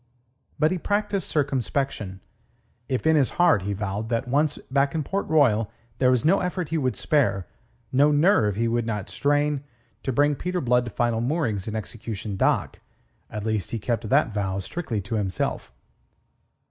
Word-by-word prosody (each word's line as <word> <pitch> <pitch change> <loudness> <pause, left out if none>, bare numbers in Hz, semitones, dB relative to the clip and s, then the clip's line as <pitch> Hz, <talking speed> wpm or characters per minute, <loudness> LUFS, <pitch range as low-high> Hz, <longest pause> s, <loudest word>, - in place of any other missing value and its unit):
But 155 0 +3
he 185 - -1
practised 205 +1 -1
circumspection. 135 -8 -1 0.7
If 130 +1 -1
in 160 0 +5
his 140 -4 +3
heart 175 - +5
he 100 +2 -2
vowed 105 +2 -3
that 115 0 -1
once 145 +3 +1
back 140 +2 +2
in 155 - 0
Port 195 +8 -2
Royal 115 -9 +3 0.3
there 130 - +4
was 125 +2 +2
no 190 +5 +5
effort 180 -3 -2
he 165 - 0
would 130 -3 0
spare, 100 - +1 0.5
no 145 +3 +4
nerve 145 - +3
he 115 +2 +1
would 115 0 0
not 105 -3 -3
strain, 145 0 +1 0.4
to 135 - -2
bring 145 +3 +3
Peter 180 +6 -2
Blood 125 -4 +2
to - - -4
final 120 -1 0
moorings 120 - -1
in 110 - -3
Execution 110 -1 -5
Dock, - - +1 0.5
at 105 0 -5
least 110 -5 -1
he 115 - -2
kept 115 0 -2
that 135 -5 +3
vow 95 -2 -1
strictly 115 - -3
to 110 +4 -3
himself. 95 -4 -2
125 Hz, 170 wpm, -25 LUFS, 105-150 Hz, 0.7 s, in